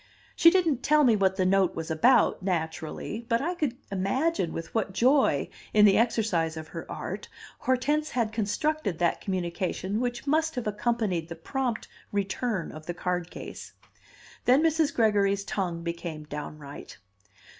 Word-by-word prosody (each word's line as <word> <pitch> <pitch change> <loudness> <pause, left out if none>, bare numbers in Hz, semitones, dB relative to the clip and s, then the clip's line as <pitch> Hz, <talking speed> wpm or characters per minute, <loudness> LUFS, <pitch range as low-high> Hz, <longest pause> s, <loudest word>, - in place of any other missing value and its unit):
She 335 - +8
didn't 335 -8 +2
tell 300 0 +4
me 240 -5 +5
what 190 -2 +2
the 190 -1 +1
note 190 -1 +3
was 165 0 -4
about, 190 +11 +4
naturally; 170 +4 -3
but 230 -1 +3
I 335 +7 -1
could 295 -8 -2
imagine 195 - 0
with 165 - -6
what 215 -4 -1
joy 270 +5 +3 0.3
in 210 -1 +8
the 195 -2 +6
exercise 200 -9 +1
of 155 -1 -7
her - - -7
art - - -5 0.3
Hortense 295 +4 +1
had 230 -3 0
constructed 220 - -1
that 170 0 +1
communication 185 +2 -2
which 245 0 -2
must 315 +2 +1
have 245 - -3
accompanied 210 -5 -1
the 170 - -5
prompt 245 +7 -3 0.2
return 200 0 -2
of 155 0 -11
the 175 - -3
card 180 -1 -2
case. - - -9 0.7
Then 260 +5 +5
Mrs. 320 -2 +2
Gregory's 200 -3 +2
tongue 175 -4 -3
became 170 -2 -5
downright. 150 -1 -8
205 Hz, 155 wpm, -27 LUFS, 175-255 Hz, 0.7 s, She